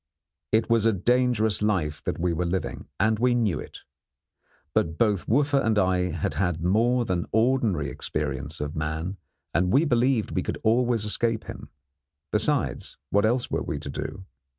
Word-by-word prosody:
It 110 +1 +2
was 115 -1 +3
a 115 - +3
dangerous 110 0 +2
life 85 -8 0
that - - -2
we 85 0 0
were 85 +1 -1
living, 95 +2 -3
and 110 +1 +2
we 125 0 +3
knew 110 -7 +1
it; - - -10 0.9
but 80 0 0
both 105 -5 +1
Wooffa 140 +3 +2
and 110 -1 +1
I 90 -2 +2
had 80 - -2
had 90 -4 -1
more 120 +7 +2
than 90 -4 -1
ordinary 110 - +2
experience 70 +3 -3
of 75 +2 -4
man, 80 +5 -3 0.4
and 90 +2 +2
we 140 +6 +4
believed 125 -3 +1
we - - 0
could - - -3
always 115 -1 +2
escape 115 +1 0
him. - - -9 0.6
Besides, - - -1
what 100 +1 +3
else 120 +2 0
were - - 0
we - - -3
to - - -6
do? 95 -1 -6
105 Hz, 170 wpm, -26 LUFS, 85-120 Hz, 0.9 s, we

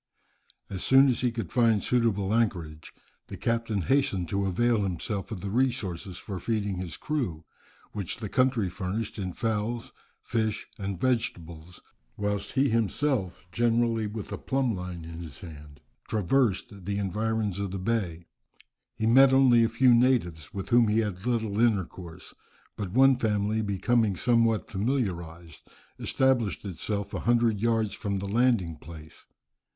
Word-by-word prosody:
As 95 -2 -6
soon 135 +1 +6
as 125 - 0
he 125 -1 +1
could 115 -7 -5
find 115 -4 +3
suitable 110 -5 +1
anchorage, 85 -9 -1 0.4
the - - -8
captain 115 -4 -1
hastened 115 - +1
to 100 +1 0
avail 115 +4 +2
himself 95 +2 -3
of 100 -5 -5
the 100 - -4
resources 105 -8 -1
for 95 -4 -6
feeding 105 -1 -2
his 85 -4 -5
crew, 110 - -3 0.5
which 100 -1 -4
the 110 -3 -5
country 125 -2 +2
furnished 100 +4 -4
in 95 -2 -3
fowls, 115 +3 -2 0.3
fish, 110 -2 -2
and 95 -2 -4
vegetables, 85 -9 -2 0.4
whilst 100 -1 -2
he 135 +1 +3
himself, 115 - 0
generally 115 0 +1
with 105 0 -6
the - - -5
plumb 130 -3 0
line 90 -3 -6
in 85 0 -8
his 80 -6 -9
hand, 75 -4 -11 0.3
traversed 105 -2 0
the 100 +1 -2
environs 105 0 -1
of 100 -1 -2
the 95 - -4
bay. 95 -5 -2 0.7
He 110 - -2
met 130 +4 +7
only 130 -3 +6
a 115 - +2
few 120 +2 +4
natives, 115 - +2
with 100 -3 -6
whom 120 -2 +5
he 105 +2 +2
had 105 0 -4
little 110 -4 0
intercourse. 95 -6 -1 0.4
But 100 -3 -4
one 135 +2 +5
family 105 -1 0
becoming 105 +1 +1
somewhat 115 +1 +2
familiarized, 90 - -3 0.3
established 120 - +1
itself 100 +2 -3
a - - -2
hundred 115 -3 +2
yards 115 -1 +1
from 100 -1 -3
the 100 +1 -4
landing 105 -7 +1
place. 80 -2 -12
105 Hz, 150 wpm, -27 LUFS, 95-115 Hz, 0.7 s, met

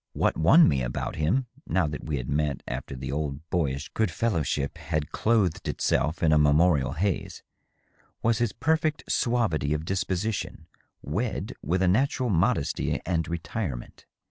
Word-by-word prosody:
What - - +1
won 150 - +6
me 70 -3 +2
about - - -3
him, 95 - +1 0.2
now 95 -2 +2
that 75 -1 -5
we 75 -2 -2
had 60 -1 -5
met 75 -1 -1
after 65 +2 -5
the 65 +1 -5
old 75 +1 -3
boyish 75 -2 -1
good 110 -3 0
fellowship 80 - -1
had 75 -1 -2
clothed 105 -7 +1
itself 80 +5 0
in 80 -1 +4
a 75 - +5
memorial 75 -1 +3
haze, 95 +5 -2 0.8
was 115 0 +2
his 120 -3 +1
perfect 155 +2 0
suavity 110 - +1
of 75 +1 -4
disposition 95 +2 -2 0.4
wed - - -2
with 90 +6 0
a - - +3
natural 125 +4 +2
modesty 95 - +1
and 85 -3 0
retirement. 85 - -5
80 Hz, 150 wpm, -27 LUFS, 75-110 Hz, 0.8 s, won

